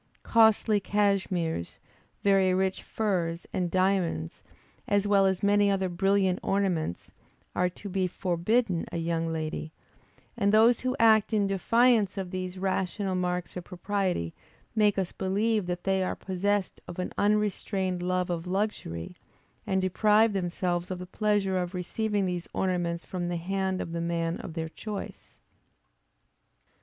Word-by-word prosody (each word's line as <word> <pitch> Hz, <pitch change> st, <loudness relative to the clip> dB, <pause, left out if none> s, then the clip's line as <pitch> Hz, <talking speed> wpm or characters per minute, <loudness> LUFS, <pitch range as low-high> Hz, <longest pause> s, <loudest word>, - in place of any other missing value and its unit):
Costly 220 Hz, -1 st, +4 dB
cashmeres, 190 Hz, -, 0 dB, 0.5 s
very 195 Hz, -2 st, +4 dB
rich 190 Hz, 0 st, 0 dB
furs, 175 Hz, -6 st, -2 dB
and 180 Hz, -2 st, 0 dB
diamonds, 185 Hz, -, 0 dB, 0.5 s
as 205 Hz, 0 st, +2 dB
well 200 Hz, -1 st, +4 dB
as 190 Hz, 0 st, -1 dB
many 205 Hz, 0 st, +4 dB
other 190 Hz, -1 st, +1 dB
brilliant 190 Hz, +1 st, +2 dB
ornaments, 180 Hz, -, -1 dB, 0.4 s
are 180 Hz, 0 st, +2 dB
to 190 Hz, +3 st, -10 dB
be 190 Hz, -1 st, 0 dB
forbidden 180 Hz, +2 st, 0 dB
a -, -, -3 dB
young 165 Hz, 0 st, -1 dB
lady; 155 Hz, 0 st, -4 dB, 0.6 s
and 200 Hz, 0 st, +2 dB
those 225 Hz, +2 st, +5 dB
who 255 Hz, 0 st, -1 dB
act 220 Hz, -1 st, +5 dB
in 210 Hz, -2 st, +3 dB
defiance 215 Hz, +2 st, +3 dB
of 190 Hz, -2 st, -4 dB
these 185 Hz, 0 st, -4 dB
rational 190 Hz, +1 st, -1 dB
marks 180 Hz, -1 st, -2 dB
of 180 Hz, -, -5 dB
propriety 185 Hz, -, -2 dB, 0.4 s
make 210 Hz, -2 st, +3 dB
us 190 Hz, -2 st, -1 dB
believe 205 Hz, +1 st, 0 dB
that 175 Hz, 0 st, -3 dB
they 190 Hz, -1 st, +1 dB
are 185 Hz, -, -2 dB
possessed 195 Hz, +1 st, -1 dB
of 175 Hz, -, -8 dB
an 180 Hz, -, -3 dB
unrestrained 200 Hz, -3 st, 0 dB
love 180 Hz, 0 st, 0 dB
of 170 Hz, 0 st, -3 dB
luxury, 180 Hz, -, -3 dB, 0.5 s
and 190 Hz, -1 st, +1 dB
deprive 210 Hz, +3 st, +3 dB
themselves 175 Hz, -1 st, -1 dB
of 185 Hz, -, -3 dB
the 180 Hz, -, -7 dB
pleasure 195 Hz, -1 st, 0 dB
of 180 Hz, +1 st, -3 dB
receiving 205 Hz, +3 st, -1 dB
these 180 Hz, -1 st, -3 dB
ornaments 175 Hz, -2 st, -1 dB
from 180 Hz, -2 st, -3 dB
the 175 Hz, -, -1 dB
hand 190 Hz, +2 st, -1 dB
of 165 Hz, -, -4 dB
the 170 Hz, 0 st, -3 dB
man 170 Hz, 0 st, -1 dB
of 160 Hz, -, -8 dB
their 160 Hz, -1 st, -3 dB
choice. 210 Hz, +4 st, -8 dB
190 Hz, 145 wpm, -28 LUFS, 175-205 Hz, 0.6 s, those